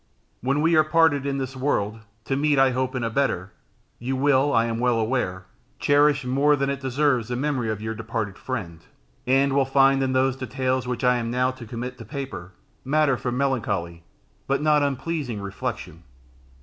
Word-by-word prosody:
When 135 +4 0
we 165 +1 +3
are 155 - +6
parted 155 -3 +3
in 140 0 -1
this 135 0 -4
world, 115 -5 -1 0.3
to 135 - -1
meet, 145 +1 +2
I 135 -1 +5
hope, 130 +1 -2
in 125 - -2
a 115 - 0
better, 110 -8 -1 0.5
you 130 +3 -2
will, 140 +1 +3
I 115 -4 +3
am 115 -1 -2
well 120 -1 +2
aware, 110 -6 -1 0.3
cherish 145 -1 +3
more 140 +4 +3
than 140 0 -1
it 140 - -3
deserves 130 -3 +1
the 125 - -3
memory 130 -3 -1
of 110 -1 -3
your 110 0 -3
departed 110 -2 -4
friend, 95 -11 -5 0.5
and 135 +1 +3
will 140 0 +3
find 135 0 +3
in 130 -1 0
those 130 0 +2
details 130 -1 -2
which 125 -1 -3
I 125 0 +4
am 115 -1 -3
now 125 +2 +1
to 130 -3 -11
commit 125 +2 -6
to 115 - -9
paper, 110 -7 -7 0.3
matter 145 0 +2
for 125 0 -3
melancholy, 105 -10 -1 0.5
but 140 +2 0
not 150 -1 +4
unpleasing 140 -3 -2
reflection. 100 0 -5
130 Hz, 190 wpm, -24 LUFS, 115-140 Hz, 0.5 s, are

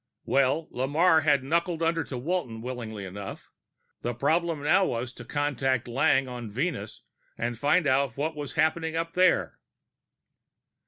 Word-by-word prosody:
Well, 140 +4 +2
Lamarre 160 +6 +3
had 145 -3 +3
knuckled 170 +3 0
under 165 0 +1
to 130 - -6
Walton 125 -6 -3
willingly 115 -5 -5
enough. 95 +1 -8 0.5
The 120 -1 -3
problem 165 +3 0
now 175 +6 +4
was 125 -5 -2
to - - -10
contact 135 -4 -1
Lang 135 +2 +2
on 120 -3 -6
Venus 115 - -3 0.3
and 120 +1 -2
find 145 +8 +2
out 135 -2 +1
what 155 +3 -1
was 145 -2 -5
happening 160 0 +1
up 165 0 -2
there.... 180 0 +2
140 Hz, 145 wpm, -27 LUFS, 120-165 Hz, 0.5 s, now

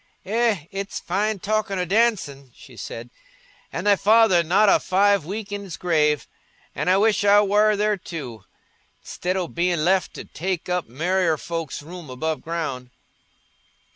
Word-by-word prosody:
"Eh, 215 -5 0
it's 195 0 -4
fine 205 +4 -1
talkin' 215 0 -1
o' 180 - -1
dancin'," 180 - 0
she 125 - -15
said, 115 +1 -8 0.6
"an' - - -4
thy 205 -1 +5
father 215 -3 +4
not 180 +6 +3
a - - +5
five 200 -2 +2
week 205 +3 -6
in's 200 -4 -6
grave. 150 -4 +1 0.5
An' - - -2
I 185 - +5
wish 210 0 +2
I 205 0 +6
war 210 +1 +3
there 210 0 +1
too, 135 - -8 0.6
i'stid 180 +2 -3
o' 180 -2 -1
bein' 170 -1 0
left 190 +1 +1
to - - -8
take 185 -1 -4
up 180 -1 -1
merrier 170 +4 0
folks's 165 -2 -5
room 170 -1 -10
above 155 +5 -3
ground." 155 -7 -4
180 Hz, 155 wpm, -23 LUFS, 160-205 Hz, 0.6 s, I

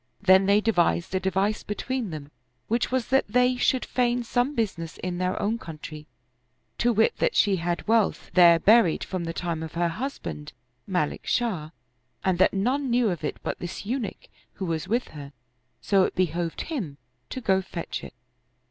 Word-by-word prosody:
Then 190 -1 +5
they 200 +1 +5
devised 175 -5 +1
a 185 - +2
device 190 +3 0
between 245 +2 -3
them, 150 -3 -8 0.4
which 235 +3 0
was 255 -2 -1
that 265 +1 +3
they 250 +3 +3
should 250 +1 +1
feign 245 -1 +1
some 245 +4 0
business 180 - -2
in 180 -1 -4
their 185 0 -1
own 220 +3 0
country, 155 -3 -9 0.7
to 240 - +3
wit 225 0 +3
that - - +1
she 200 -3 +4
had 175 +2 -2
wealth 225 -2 +1
there 170 -2 +7
buried 205 -1 +4
from 185 -3 -4
the 165 - -3
time 170 -2 -3
of 160 -1 -6
her 170 0 +1
hus 260 +11 -4
band, 150 +1 -7 0.3
Malik 180 -6 -1
Shah, 190 -11 0 0.5
and 185 -2 +1
that 185 - +5
none 255 +8 0
knew 240 -3 +3
of 175 - -5
it 150 - -2
but - - -3
this 175 +3 -6
Eunuch 230 -3 -4 0.3
who 190 - -5
was 165 -2 -2
with 240 +3 0
her, 145 -2 -10 0.5
so 195 -2 +3
it - - -4
behooved 170 -2 -1
him 195 - -4 0.3
to - - -4
go 190 -5 +2
fetch 190 - -6
it. - - -10
190 Hz, 185 wpm, -26 LUFS, 170-235 Hz, 0.7 s, there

